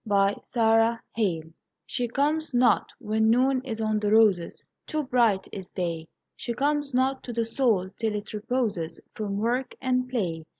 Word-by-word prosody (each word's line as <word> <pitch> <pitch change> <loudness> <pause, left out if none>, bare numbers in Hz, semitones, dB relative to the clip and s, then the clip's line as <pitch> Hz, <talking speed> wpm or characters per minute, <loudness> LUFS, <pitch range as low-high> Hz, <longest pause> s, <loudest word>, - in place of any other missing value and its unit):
Y 200 -2 +2
Z 235 -2 -1 0.5
She 220 -2 +2
Comes 160 - -9
Not 160 - -18 0.3
She 245 -2 -2
comes 295 +4 0
not 245 -1 +3
when 220 +1 +1
Noon 255 +3 +3
is 225 -4 -4
on 215 -1 +1
the 210 -1 0
roses 210 -6 +3 0.2
Too 310 -1 -1
bright 235 -7 +2
is 190 -2 -7
Day. 170 -3 -3 0.3
She 235 - -4
comes 290 +1 0
not 260 +1 +1
to 245 - -7
the 230 -1 -1
Soul 225 -6 +1
till 220 -2 -1
it 210 +1 -6
reposes 210 -7 -2
From 200 -2 -3
work 240 +5 -1
and 255 -1 0
play. 175 -10 -2
225 Hz, 175 wpm, -26 LUFS, 205-255 Hz, 0.5 s, not